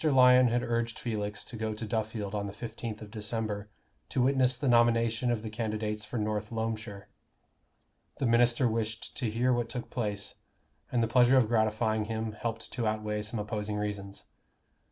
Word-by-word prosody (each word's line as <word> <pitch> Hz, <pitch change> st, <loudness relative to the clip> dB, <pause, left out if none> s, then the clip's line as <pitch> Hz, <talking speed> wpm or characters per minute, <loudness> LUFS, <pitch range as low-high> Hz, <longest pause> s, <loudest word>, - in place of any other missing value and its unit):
Lyon 130 Hz, -4 st, +7 dB
had 120 Hz, +1 st, +1 dB
urged 115 Hz, -1 st, -1 dB
Felix 105 Hz, -3 st, -3 dB
to -, -, -9 dB
go 110 Hz, -1 st, -2 dB
to 110 Hz, -, -5 dB
Duffield 110 Hz, -2 st, -2 dB
on 100 Hz, -1 st, -2 dB
the 100 Hz, -, -6 dB
fifteenth 115 Hz, -1 st, -6 dB
of 105 Hz, -, -11 dB
December 105 Hz, -1 st, -3 dB, 0.4 s
to 125 Hz, -, +1 dB
witness 130 Hz, -1 st, +3 dB
the 135 Hz, -, -2 dB
nomination 115 Hz, 0 st, +3 dB
of 115 Hz, -2 st, 0 dB
the 110 Hz, -, -4 dB
candidates 110 Hz, -1 st, -2 dB
for 115 Hz, +3 st, -4 dB
North 105 Hz, 0 st, -1 dB
Loamshire. 110 Hz, -3 st, -4 dB, 1.1 s
The -, -, -1 dB
minister 120 Hz, +2 st, +4 dB
wished 110 Hz, -1 st, -3 dB
to 120 Hz, -5 st, 0 dB
hear 120 Hz, +4 st, +2 dB
what 120 Hz, -1 st, -1 dB
took 125 Hz, -2 st, -5 dB
place; 105 Hz, -4 st, -3 dB, 0.6 s
and 120 Hz, -2 st, +2 dB
the -, -, +2 dB
pleasure 125 Hz, +2 st, +5 dB
of 125 Hz, -4 st, +5 dB
gratifying 110 Hz, -1 st, +1 dB
him 110 Hz, 0 st, -2 dB
helped 115 Hz, +1 st, -4 dB
to 120 Hz, -3 st, -1 dB
outweigh 105 Hz, 0 st, -1 dB
some 110 Hz, +2 st, -4 dB
opposing 105 Hz, 0 st, -3 dB
reasons. 100 Hz, -1 st, -4 dB
110 Hz, 175 wpm, -30 LUFS, 105-120 Hz, 1.1 s, Lyon